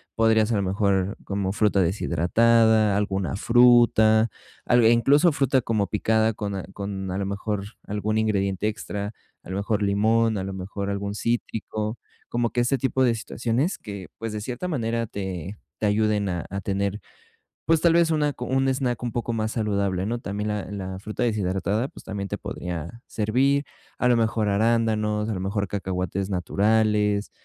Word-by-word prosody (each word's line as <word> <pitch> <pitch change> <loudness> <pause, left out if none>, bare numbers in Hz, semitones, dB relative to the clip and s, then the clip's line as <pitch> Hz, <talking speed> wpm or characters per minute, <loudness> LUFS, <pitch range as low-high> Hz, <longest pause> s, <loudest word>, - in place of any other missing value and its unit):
Podrías, 110 0 +3
a - - +2
lo 100 - +1
mejor, 95 0 0
como 100 -1 -1
fruta 105 -2 +2
deshidratada, 110 +5 +3
alguna 100 -2 -1
fruta, 115 -1 +5 0.4
al 120 -1 +4
e 115 - +7
incluso 145 +8 +4
fruta 135 -2 +2
como 110 -3 0
picada 110 +1 +1
con 100 -1 -4
a 95 - -4
con 100 -1 -5
a 95 - -2
lo 100 - -1
mejor, 100 +1 -3 0.2
algún 105 +1 -1
ingrediente 100 -2 0
extra, 105 -1 -5 0.3
a - - -13
lo 95 - -3
mejor 105 +1 -1
limón, 110 +2 +2
a 95 - -2
lo 95 - -5
mejor 100 +1 -5
algún 100 0 -3
cítrico, 110 -1 -2 0.3
como 120 -1 0
que 120 - +1
ese 130 +3 +1
tipo 130 +1 +1
de 120 -2 +3
situaciones 120 - -1
que, 100 -4 -8
pues, 115 -1 -4
de 105 - -4
cierta 125 - -4
manera, 115 -7 -1
te 95 -1 -5 0.2
te 105 - +1
ayuden 105 -1 +1
a 90 -2 -3
a 100 - -3
tener, 100 +1 -2 0.6
pues, 160 +1 +3
tal 170 - +5
vez 170 -1 +4
una 150 -2 +2
co 125 - -6
un 135 +1 +1
snack 125 -3 -1
un 120 - -2
poco 120 0 -2
más 110 -1 -1
saludable, 100 -4 0
¿no? 120 +2 -2
También, 105 -1 -4
la 105 -1 -3
la 95 -2 -5
fruta 105 +4 -4
deshidratada, 105 +2 0
pues, - - -14
también 100 -1 -4
te - - -3
podría 90 +6 -6
servir, 130 +6 +1 0.3
a 125 - +1
lo 125 - +5
mejor 110 -1 +1
arándanos, 110 0 +1
a - - -1
lo 95 - -4
mejor 100 +1 -1
cacahuates 95 0 -3
naturales. 105 +2 +1
105 Hz, 175 wpm, -24 LUFS, 100-115 Hz, 0.6 s, e